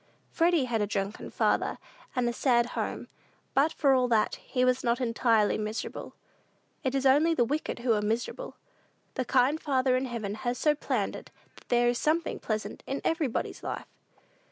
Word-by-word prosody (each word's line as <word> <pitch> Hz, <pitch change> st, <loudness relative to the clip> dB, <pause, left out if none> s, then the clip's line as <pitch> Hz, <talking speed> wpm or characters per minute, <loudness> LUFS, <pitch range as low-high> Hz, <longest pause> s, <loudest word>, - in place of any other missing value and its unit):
Freddy 335 Hz, -4 st, +3 dB
had 230 Hz, -3 st, -1 dB
a 205 Hz, -, +1 dB
drunken 200 Hz, 0 st, -3 dB
father, -, -, +1 dB, 0.4 s
and 250 Hz, -2 st, +1 dB
a 240 Hz, -, 0 dB
sad 240 Hz, -2 st, +3 dB
home; -, -, -3 dB, 0.5 s
but, 290 Hz, +4 st, +3 dB
for 280 Hz, -4 st, +3 dB
all 255 Hz, -1 st, +3 dB
that, 225 Hz, -3 st, +2 dB
he 255 Hz, -1 st, -1 dB
was 255 Hz, 0 st, +2 dB
not 235 Hz, +1 st, +1 dB
entirely 230 Hz, -3 st, +2 dB
miserable. 215 Hz, +1 st, -5 dB, 0.7 s
It 265 Hz, -1 st, 0 dB
is 270 Hz, 0 st, 0 dB
only 300 Hz, +5 st, +5 dB
the 240 Hz, -, +3 dB
wicked 295 Hz, +6 st, -2 dB
who 240 Hz, -1 st, +1 dB
are 210 Hz, -, +1 dB
miserable. 230 Hz, -, -3 dB, 0.6 s
The 255 Hz, -, -2 dB
kind 265 Hz, +5 st, +2 dB
Father 260 Hz, -3 st, +2 dB
in 255 Hz, +1 st, 0 dB
heaven 230 Hz, -5 st, -4 dB
has 245 Hz, 0 st, -1 dB
so 300 Hz, -, +3 dB
planned 295 Hz, -, -2 dB
it -, -, -10 dB, 0.3 s
that -, -, -19 dB
there 240 Hz, 0 st, +3 dB
is 240 Hz, 0 st, +1 dB
something 325 Hz, +2 st, 0 dB
pleasant 215 Hz, -1 st, -3 dB
in 275 Hz, -, -3 dB
everybody's 315 Hz, -7 st, -1 dB
life. -, -, -5 dB
250 Hz, 180 wpm, -29 LUFS, 235-275 Hz, 0.7 s, only